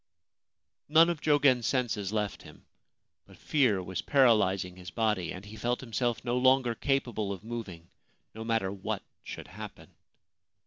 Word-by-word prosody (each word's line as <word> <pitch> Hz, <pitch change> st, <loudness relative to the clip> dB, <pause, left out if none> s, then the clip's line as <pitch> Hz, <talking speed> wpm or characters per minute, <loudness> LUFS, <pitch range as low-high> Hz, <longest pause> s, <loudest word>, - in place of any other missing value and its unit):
None 165 Hz, +3 st, +6 dB
of 165 Hz, -3 st, -5 dB
Jogen's 140 Hz, -6 st, +3 dB
senses 110 Hz, -7 st, -1 dB
left 105 Hz, -3 st, -2 dB
him; -, -, -15 dB, 0.6 s
but -, -, -16 dB
fear 120 Hz, -11 st, +2 dB
was 90 Hz, 0 st, -4 dB
paralysing 100 Hz, -9 st, +3 dB
his 90 Hz, 0 st, -9 dB
body, 105 Hz, -4 st, 0 dB
and 90 Hz, +2 st, -8 dB
he 105 Hz, +1 st, -10 dB
felt 120 Hz, +3 st, -1 dB
himself 120 Hz, -1 st, -2 dB
no 120 Hz, +1 st, +1 dB
longer 130 Hz, -1 st, +4 dB
capable 120 Hz, -5 st, -1 dB
of 100 Hz, 0 st, -6 dB
moving 105 Hz, -8 st, -7 dB, 0.2 s
— -, -, -44 dB
no 110 Hz, -, -7 dB
matter 115 Hz, -4 st, 0 dB
what 100 Hz, -1 st, -4 dB, 0.2 s
should -, -, -8 dB
happen. -, -, -10 dB
115 Hz, 150 wpm, -29 LUFS, 100-130 Hz, 0.6 s, None